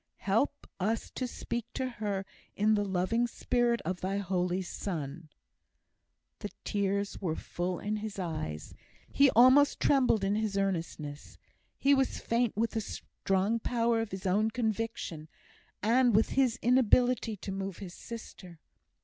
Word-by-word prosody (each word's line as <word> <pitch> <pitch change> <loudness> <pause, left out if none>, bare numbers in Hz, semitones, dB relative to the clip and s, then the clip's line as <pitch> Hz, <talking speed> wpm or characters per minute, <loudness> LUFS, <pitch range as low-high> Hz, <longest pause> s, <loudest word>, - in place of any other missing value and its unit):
Help 225 +9 +1
us 215 +4 -1
to 255 - -3
speak 235 -1 -4
to 260 - -1
her 205 -5 -3 0.3
in 215 +2 +3
the 205 -1 +2
loving 200 +5 +1
spirit 240 0 +1
of 180 +2 -3
thy 195 +2 -1
Holy 185 -1 -1
Son!" 165 -4 -5 1.1
The - - -5
tears 200 0 -1
were 165 -5 -1
full 175 +2 -3
in 210 +4 -2
his 210 -1 -6
eyes; 155 - -4 0.4
he 280 0 +6
almost 255 +5 +6
trembled 250 -7 +3
in 195 +1 +2
his 210 -2 -1
earnestness. 165 -6 -3 0.4
He 280 +1 +4
was 270 -2 +1
faint 230 -2 0
with 230 +1 +1
the 225 - -1
strong 195 +2 -1
power 230 -1 +1
of 225 - -3
his 190 0 -7
own 205 +4 +2
conviction, 220 -8 -3 0.5
and 240 +1 +4
with 220 - +4
his 255 -3 +2
inability 245 -1 +3
to 195 - -6
move 195 -1 -4
his 185 -3 -8
sister. 185 -7 -10
210 Hz, 145 wpm, -30 LUFS, 185-235 Hz, 1.1 s, he